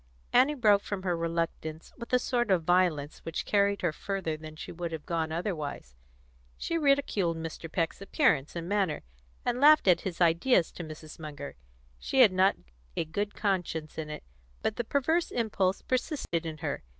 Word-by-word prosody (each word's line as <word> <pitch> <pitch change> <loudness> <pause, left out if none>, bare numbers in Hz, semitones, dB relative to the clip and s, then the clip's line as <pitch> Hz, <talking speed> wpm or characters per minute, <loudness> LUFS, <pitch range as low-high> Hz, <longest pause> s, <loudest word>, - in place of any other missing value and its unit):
Annie 265 +4 +5
broke 210 -6 +4
from 200 -2 -5
her 180 -2 +1
reluctance 165 -1 -3
with 235 - -9
a 250 - +5
sort 240 -2 0
of 185 -4 +3
violence 165 -4 +2
which 165 - -4
carried 200 -1 +2
her 175 - +2
further 190 -3 -3
than 155 0 -10
she - - -8
would 170 0 -4
have 160 -2 -6
gone 165 -2 -1
otherwise. 155 - -4 0.6
She 335 - -2
ridiculed 275 - +2
Mr. 165 0 -6
Peck's 165 +2 -1
appearance 150 -7 +1
and 170 0 -4
manner, 195 -5 0 0.4
and 245 +1 0
laughed 305 -5 +7
at 175 -2 +5
his 180 -3 -5
ideas 170 +3 +3
to 175 - -7
Mrs. 155 0 -10
Munger. 150 -2 -7 0.4
She 265 - +2
had 225 -6 +8
not 190 +1 +4 0.4
a - - 0
good 205 +6 -3
conscience 175 -6 -2
in 155 -1 -4
it, 150 - -6 0.4
but 215 - 0
the 240 - 0
perverse 320 +8 +1
impulse 200 -5 0
persisted 255 - -1
in 155 -1 -5
her. 140 - -2
175 Hz, 175 wpm, -29 LUFS, 160-210 Hz, 0.6 s, had